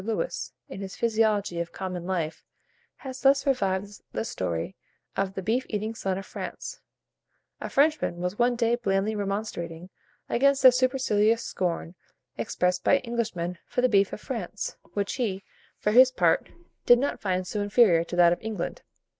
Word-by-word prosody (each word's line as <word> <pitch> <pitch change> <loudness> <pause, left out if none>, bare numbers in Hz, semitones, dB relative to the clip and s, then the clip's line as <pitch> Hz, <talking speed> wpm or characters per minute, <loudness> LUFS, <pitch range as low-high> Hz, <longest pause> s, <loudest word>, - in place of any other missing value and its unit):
Lewis, 225 - -2 0.2
in 195 - -8
his 190 -1 -6
"Physiology 215 -6 +1
of 170 0 -3
Common 180 -2 -5
Life," 165 -4 -2 0.5
has 260 -1 -8
thus 275 0 +4
revived 205 -6 -1
the - - -2
story 85 - -3 0.4
of 195 0 -1
the 190 - -4
beef 235 +6 +1
eating 215 +1 -2
son 190 -4 -2
of 195 - -6
France: - - -7 0.8
"A - - -5
Frenchman 290 - +2
was 180 +4 -3
one 240 0 +3
day 235 -1 +1
blandly 200 -2 0
remonstrating 195 -4 -4 0.4
against 275 +3 +2
the 255 - +10
supercilious 245 -4 +2
scorn 175 -2 -2 0.4
expressed 180 +10 0
by 280 - +4
Englishmen 215 -8 -3
for 250 - -1
the 255 - +3
beef 200 -2 +3
of - - -6
France, 210 -4 -5 0.2
which 200 -1 -1
he, 195 -5 -1 0.3
for 210 - 0
his 255 +3 +7
part, 175 -9 +2 0.4
did 245 - +8
not 280 +4 -2
find 185 -2 -1
so 205 +3 -3
inferior 205 -5 +4
to 175 - -6
that 175 -1 +6
of - - -6
England. 215 -5 -4
205 Hz, 165 wpm, -27 LUFS, 180-235 Hz, 0.8 s, the